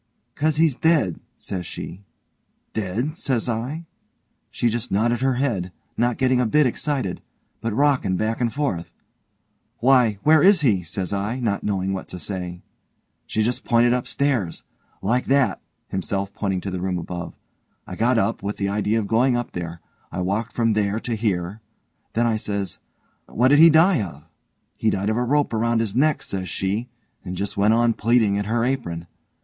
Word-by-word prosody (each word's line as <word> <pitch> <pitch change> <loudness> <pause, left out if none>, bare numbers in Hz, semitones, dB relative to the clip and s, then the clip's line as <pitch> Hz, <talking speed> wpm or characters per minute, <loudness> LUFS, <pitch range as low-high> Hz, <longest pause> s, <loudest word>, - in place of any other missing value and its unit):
''Cause 155 0 +1
he's 155 -5 +3
dead', 155 - +2 0.2
says 90 -2 -5
she. 90 +3 -7 0.7
'Dead?' 110 - -2
says 130 -8 -1
I. 125 +8 -3 0.6
She 120 - 0
just 115 0 -2
nodded 120 +4 +1
her 135 -1 +2
head, 110 -9 -1 0.2
not 120 0 +1
getting 130 -1 +3
a 125 - +1
bit 150 +6 +4
excited, 130 -5 -1 0.4
but 115 0 -1
rockin' 125 -6 +2
back 110 +4 -1
and 120 -2 +1
forth. 135 - -2 0.9
'Why 125 -4 +4
where 155 0 +6
is 195 -2 +6
he?' 110 -10 +3
says 90 +2 -4
I, 105 +6 -2
not 110 -5 -1
knowing 95 -2 -1
what 95 - -5
to - - -7
say. 90 -1 -5 0.6
She 110 - 0
just 120 +3 -1
pointed 120 0 +4
upstairs 125 -6 -1 0.4
like 120 +5 +1
that 130 -8 +2 0.3
(himself 100 +1 -2
pointing 95 -3 -2
to 95 - -4
the 90 -1 -3
room 95 -1 -1
above) 85 0 -6 0.5
I 90 - -7
got 120 +5 +2
up, 115 0 0
with 100 +1 -3
the 100 -1 -1
idea 105 +2 0
of 110 - 0
going 120 +4 +3
up 120 - -3
there. 85 -1 -6 0.3
I 90 - -3
walked 105 +6 -1
from 115 -2 +2
there 105 0 0
to 120 - -3
here 105 -2 -2 0.5
then 120 +1 +2
I 115 -2 +2
says, 100 -3 -3 0.5
'Why, - - -17
what 125 +3 +4
did 145 +1 +6
he 165 +1 +10
die 165 - +5
of?' 75 -7 -7 0.5
'He 110 - +2
died 100 +1 0
of 110 - -1
a 120 - +1
rope 145 +1 +1
round 115 +1 +1
his 110 -3 -2
neck', 150 +4 +2
says 95 -2 -4
she, 100 +8 -2 0.3
and 90 - -5
just 100 +2 -3
went 105 +3 +4
on 120 0 +3
pleatin' 110 -2 +2
at 100 - -3
her 115 +1 +1
apron. 85 -11 -2
110 Hz, 180 wpm, -23 LUFS, 95-125 Hz, 0.9 s, he